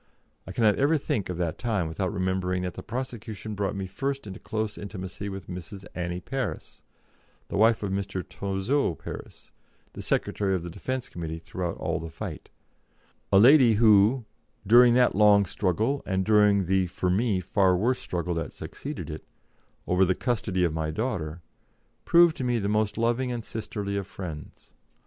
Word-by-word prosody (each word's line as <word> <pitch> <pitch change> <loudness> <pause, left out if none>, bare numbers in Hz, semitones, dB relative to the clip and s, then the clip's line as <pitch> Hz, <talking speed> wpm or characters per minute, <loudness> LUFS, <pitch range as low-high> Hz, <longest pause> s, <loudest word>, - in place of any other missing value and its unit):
I - - -6
cannot 105 +1 +3
ever 145 +4 +3
think 135 - -2
of 90 - -3
that 85 -3 -2
time 105 -8 0
without 90 +4 -2
remembering 95 -2 -1
that 90 -1 -3
the - - -7
prosecution 110 -3 -5
brought 100 -1 -2
me 95 -1 -3
first 135 +7 -3
into 95 -2 -8
close 110 -1 -3
intimacy 100 0 -6
with 95 -1 -7
Mrs. 95 +2 -8
Annie 85 0 -3
Parris 135 +7 -5 0.7
the - - -4
wife 110 +2 +4
of 100 - -2
Mr. 95 -1 -3
Touzeau 100 - -1
Parris, - - -10 0.4
the - - -7
Secretary 95 -2 0
of 90 - -3
the 85 - -6
Defence 130 +7 -4
Committee 80 -2 -5
throughout 85 +1 -4
all - - -2
the 80 0 -6
fight - - -7 0.8
a 100 - +6
lady 125 +2 +7
who, 110 +2 +5 0.4
during 120 +3 +7
that 125 -1 +4
long 105 0 +5
struggle, 110 +9 0
and 95 -1 0
during 105 -2 +4
the, 95 +1 +2
for 90 +1 -1
me, 100 0 +1
far 90 0 +2
worse 125 +7 +1
struggle 90 0 -3
that 80 -1 -4
succeeded - - -7
it, - - -7 0.6
over 90 +1 +3
the 95 0 +2
custody 105 -7 -1
of 85 -3 +1
my 80 -1 -2
daughter, 85 -4 -3 0.6
proved 170 -1 +6
to - - -3
me 120 -1 +1
the 100 -3 -1
most 105 0 0
loving 120 +2 +1
and 120 -2 -4
sisterly 105 -2 -4
of 100 -2 -3
friends. 85 -7 -9
100 Hz, 170 wpm, -27 LUFS, 90-115 Hz, 0.8 s, lady